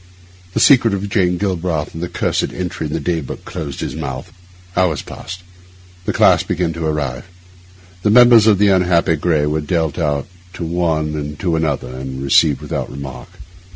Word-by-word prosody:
The -, -, +2 dB
secret 120 Hz, -7 st, +5 dB
of 100 Hz, +1 st, -4 dB
Jane 90 Hz, -3 st, +1 dB
Galbraith 90 Hz, -5 st, -2 dB
and 80 Hz, -, -7 dB
the 90 Hz, -, -3 dB
cursed -, -, -1 dB
entry 90 Hz, -3 st, -4 dB
in 75 Hz, -, -6 dB
the -, -, -1 dB
day 85 Hz, +2 st, -1 dB
book 70 Hz, -, -8 dB
closed 70 Hz, -4 st, -6 dB
his -, -, -4 dB
mouth. 65 Hz, -1 st, -6 dB, 0.4 s
Hours 90 Hz, -6 st, +1 dB
passed; 90 Hz, +1 st, -9 dB, 0.6 s
the -, -, 0 dB
class -, -, +4 dB
began 85 Hz, -1 st, -1 dB
to 80 Hz, -1 st, -3 dB
arrive; 75 Hz, -5 st, -3 dB, 0.7 s
the 105 Hz, -, +1 dB
members 120 Hz, -1 st, +7 dB
of 105 Hz, -3 st, +5 dB
the 100 Hz, +1 st, +4 dB
unhappy 90 Hz, -3 st, +3 dB
Gray 75 Hz, -1 st, +1 dB
were 75 Hz, +1 st, 0 dB
dealt 80 Hz, +1 st, -1 dB
out 75 Hz, -4 st, -1 dB, 0.3 s
to 90 Hz, -3 st, -5 dB
one 80 Hz, -2 st, 0 dB
and 75 Hz, -1 st, -5 dB
to 85 Hz, -3 st, 0 dB
another, 75 Hz, -5 st, -2 dB
and 65 Hz, +1 st, -6 dB
received 70 Hz, +1 st, +3 dB
without -, -, -4 dB
remark. 65 Hz, -3 st, -8 dB
80 Hz, 180 wpm, -18 LUFS, 75-90 Hz, 0.7 s, members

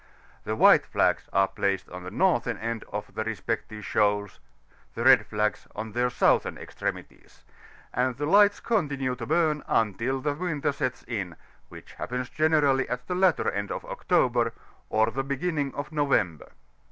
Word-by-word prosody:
The -, -, -2 dB
white -, -, +6 dB
flags -, -, +1 dB
are 95 Hz, 0 st, +3 dB
placed 95 Hz, -1 st, -1 dB
on 90 Hz, +1 st, -7 dB
the 90 Hz, -, -7 dB
northern 120 Hz, -, +1 dB
end 115 Hz, 0 st, -4 dB
of 105 Hz, 0 st, -5 dB
the 110 Hz, -, -2 dB
respective 110 Hz, -1 st, -4 dB
shoals, 105 Hz, -1 st, 0 dB, 0.6 s
the 115 Hz, -, -3 dB
red 130 Hz, 0 st, +6 dB
flags 105 Hz, 0 st, -1 dB
are -, -, -3 dB
on 110 Hz, 0 st, -7 dB
their 125 Hz, +3 st, +1 dB
soutibern 125 Hz, -, +2 dB
extremities, -, -, -7 dB, 0.5 s
and 125 Hz, 0 st, 0 dB
the 145 Hz, -, -2 dB
lights 205 Hz, +5 st, +5 dB
continue 140 Hz, -, -1 dB
to 120 Hz, -2 st, -7 dB
bum 155 Hz, -2 st, +1 dB
until 115 Hz, +5 st, 0 dB
the 145 Hz, +2 st, -1 dB
winter 150 Hz, -3 st, -1 dB
sets 135 Hz, -3 st, -3 dB
in, 95 Hz, -8 st, -4 dB, 0.3 s
which -, -, -13 dB
happens 125 Hz, +1 st, -4 dB
generally 150 Hz, -4 st, +2 dB
at 125 Hz, 0 st, -4 dB
the -, -, -3 dB
latter 180 Hz, -2 st, +2 dB
end 100 Hz, +1 st, -3 dB
of -, -, -5 dB
October, 120 Hz, -2 st, +1 dB, 0.4 s
or 110 Hz, +1 st, +2 dB
the 135 Hz, +3 st, -2 dB
b^inning 140 Hz, +1 st, -2 dB
of 145 Hz, +1 st, -5 dB
November. 125 Hz, -, 0 dB
125 Hz, 165 wpm, -26 LUFS, 110-145 Hz, 0.6 s, white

